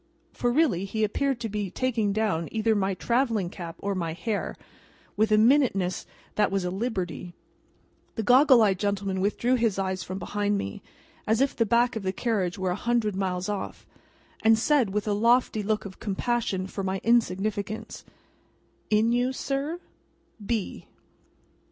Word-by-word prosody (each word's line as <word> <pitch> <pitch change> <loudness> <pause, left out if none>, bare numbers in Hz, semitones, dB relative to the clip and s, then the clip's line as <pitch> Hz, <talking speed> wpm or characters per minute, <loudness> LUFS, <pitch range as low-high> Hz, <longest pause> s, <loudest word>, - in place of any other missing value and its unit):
For, 245 - 0
really, 245 - +2
he 220 +2 -2
appeared 265 +4 0
to 230 - -1
be 205 -2 -3
taking 225 -1 0
down, 195 -6 0
either 220 0 +1
my 195 -2 0
travelling 230 -4 0
cap 170 -4 -7
or 200 0 -2
my 170 -4 -2
hair, 200 +5 -3 0.6
with 215 0 +2
a 215 - +6
minuteness 220 -6 +3 0.3
that 210 -1 +2
was 195 -2 0
a 180 - -1
liberty. 185 -4 -3 0.8
The 225 - -2
goggle 255 +1 +6
eyed 195 -3 +2
gentleman 200 -2 -1
withdrew 225 +5 +1
his 230 -5 +1
eyes 190 -1 -1
from 185 +1 -5
behind 205 +2 -1
me, 100 - -5 0.5
as 220 +1 +2
if 275 +1 +1
the 230 - +1
back 235 +3 +3
of 220 - -3
the 190 -1 -1
carriage 195 -4 -1
were 190 -1 -1
a - - -1
hundred 230 -2 0
miles 185 -1 -2
off, 205 -2 -5 0.6
and 225 0 +6
said, 255 -1 +2
with 210 +2 -2
a 210 - +2
lofty 230 +1 +3
look 210 0 -1
of 190 -1 -9
compassion 205 -2 -1
for 195 +1 -5
my 190 0 -1
insignificance: 215 -2 0 0.9
"In 220 +2 +3
you, 245 +2 +2
sir? 275 +5 -3
210 Hz, 160 wpm, -26 LUFS, 190-235 Hz, 0.9 s, a